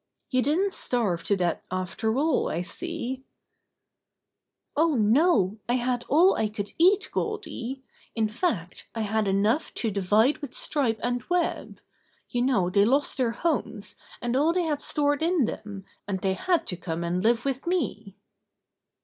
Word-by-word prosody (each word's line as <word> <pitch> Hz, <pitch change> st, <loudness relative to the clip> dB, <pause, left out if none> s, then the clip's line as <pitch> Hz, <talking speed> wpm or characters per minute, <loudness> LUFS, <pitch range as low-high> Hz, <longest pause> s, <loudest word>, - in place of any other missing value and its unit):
"You 255 Hz, -1 st, +3 dB
didn't 365 Hz, +9 st, +1 dB
starve 205 Hz, -9 st, 0 dB
to 200 Hz, -, +2 dB
death 175 Hz, -2 st, 0 dB
after 185 Hz, +5 st, -2 dB
all, 310 Hz, +3 st, +1 dB
I 170 Hz, -, -2 dB
see/' 265 Hz, -, -5 dB, 1.5 s
"Oh, 315 Hz, 0 st, +3 dB
no, 220 Hz, -, +3 dB
I 245 Hz, -, +3 dB
had 245 Hz, -1 st, -1 dB
all 345 Hz, +7 st, +6 dB
I 220 Hz, -, 0 dB
could 205 Hz, -1 st, -5 dB
eat, 380 Hz, +5 st, +4 dB
Goldy. 270 Hz, -, -4 dB, 0.3 s
In 220 Hz, -2 st, +2 dB
fact, 210 Hz, -, -2 dB
I 225 Hz, -, -2 dB
had 215 Hz, 0 st, 0 dB
enough 205 Hz, +9 st, +1 dB
to 225 Hz, -, -1 dB
divide 210 Hz, +7 st, +2 dB
with 280 Hz, -4 st, -7 dB
Stripe 245 Hz, -7 st, 0 dB
and 245 Hz, 0 st, 0 dB
Web. 355 Hz, -1 st, -1 dB, 0.5 s
You 245 Hz, -, -1 dB
know 240 Hz, -9 st, +2 dB
they 200 Hz, +1 st, +4 dB
lost 270 Hz, +7 st, +2 dB
their 255 Hz, -3 st, +2 dB
homes, 235 Hz, -5 st, -2 dB, 0.3 s
and 240 Hz, +1 st, 0 dB
all 305 Hz, +5 st, +3 dB
they 360 Hz, 0 st, +1 dB
had 300 Hz, -3 st, -1 dB
stored 290 Hz, 0 st, +1 dB
in 330 Hz, -4 st, +2 dB
them, 200 Hz, -3 st, -6 dB, 0.2 s
and 195 Hz, -2 st, -2 dB
they 190 Hz, -1 st, +1 dB
had 350 Hz, -, +1 dB
to 180 Hz, -, -2 dB
come 170 Hz, -1 st, -4 dB
and 175 Hz, +2 st, -1 dB
live 235 Hz, +2 st, +2 dB
with 270 Hz, +2 st, -2 dB
me." 225 Hz, -, -2 dB
240 Hz, 160 wpm, -26 LUFS, 205-295 Hz, 1.5 s, all